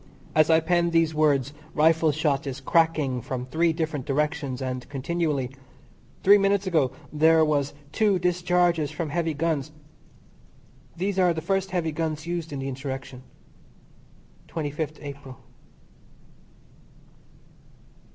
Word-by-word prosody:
NOTE -, -, +2 dB
As 155 Hz, -, +5 dB
I 160 Hz, 0 st, +6 dB
pen 170 Hz, +1 st, +2 dB
these 165 Hz, -1 st, +2 dB
words 145 Hz, -3 st, +2 dB, 0.2 s
rifle 160 Hz, 0 st, +4 dB
shot 145 Hz, -1 st, 0 dB
is 135 Hz, -1 st, -4 dB
cracking 150 Hz, -4 st, +1 dB
from 125 Hz, +1 st, -4 dB
three 165 Hz, +6 st, +1 dB
different 160 Hz, -4 st, -3 dB
directions 145 Hz, -2 st, -1 dB
and 130 Hz, -2 st, -4 dB
continually. 145 Hz, -2 st, -1 dB, 0.7 s
Three 205 Hz, +2 st, +7 dB
minutes 200 Hz, 0 st, +2 dB
ago 155 Hz, -8 st, +2 dB, 0.2 s
there 160 Hz, +1 st, +5 dB
was 145 Hz, -2 st, 0 dB, 0.2 s
two 205 Hz, +1 st, +2 dB
discharges 175 Hz, -3 st, +1 dB
from 160 Hz, -4 st, -4 dB
heavy 165 Hz, -1 st, -1 dB
guns. 155 Hz, -2 st, -1 dB, 1.3 s
These 190 Hz, +2 st, -1 dB
are 180 Hz, -2 st, +3 dB
the 160 Hz, -, -3 dB
first 195 Hz, +3 st, -1 dB
heavy 175 Hz, -4 st, -1 dB
guns 155 Hz, 0 st, -3 dB
used 170 Hz, -2 st, -4 dB
in 140 Hz, -, -4 dB
the 135 Hz, 0 st, -4 dB
Insurrection, 130 Hz, -1 st, -6 dB, 1.3 s
25th 155 Hz, 0 st, -4 dB
April. 140 Hz, -3 st, -9 dB
155 Hz, 125 wpm, -25 LUFS, 140-170 Hz, 1.3 s, Three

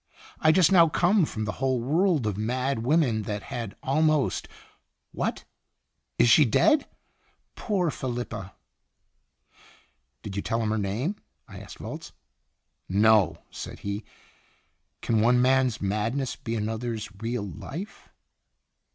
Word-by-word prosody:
* -, -, -21 dB
I 155 Hz, -, +5 dB
just 175 Hz, 0 st, +4 dB
now 170 Hz, -4 st, +6 dB
come 180 Hz, +3 st, +3 dB
from 110 Hz, -6 st, -4 dB
a -, -, 0 dB
whole 130 Hz, +2 st, 0 dB
world 155 Hz, -, +1 dB
of 105 Hz, -3 st, -1 dB
mad 125 Hz, +5 st, -1 dB
women 125 Hz, -3 st, +2 dB
that 105 Hz, -1 st, -3 dB
had 115 Hz, -4 st, -5 dB
almost 155 Hz, +1 st, +1 dB, 0.6 s
what, -, -, -3 dB, 0.7 s
is -, -, +5 dB
she 150 Hz, +6 st, +7 dB
dead 290 Hz, -, +3 dB, 0.3 s
?' -, -, -41 dB
Poor 185 Hz, -7 st, 0 dB
Felipa!" 120 Hz, -7 st, -5 dB, 1.7 s
"Did 100 Hz, -2 st, -6 dB
you 100 Hz, -, -1 dB
tell 115 Hz, -, -1 dB
him 110 Hz, -, 0 dB
her 110 Hz, -, 0 dB
name?" 115 Hz, -, -2 dB, 0.3 s
I -, -, -10 dB
asked -, -, -11 dB
Volz. -, -, -8 dB, 0.8 s
"No," 105 Hz, +1 st, +3 dB
said -, -, -8 dB
he. 100 Hz, +2 st, -4 dB, 1.0 s
"Can 110 Hz, -2 st, +2 dB
one 120 Hz, +2 st, +4 dB
man's 130 Hz, -2 st, +3 dB
madness 110 Hz, +6 st, -1 dB
be 115 Hz, -4 st, -5 dB
another's 110 Hz, 0 st, -3 dB
real 115 Hz, -2 st, -2 dB
life?" 160 Hz, -, -8 dB
120 Hz, 135 wpm, -26 LUFS, 110-150 Hz, 1.7 s, she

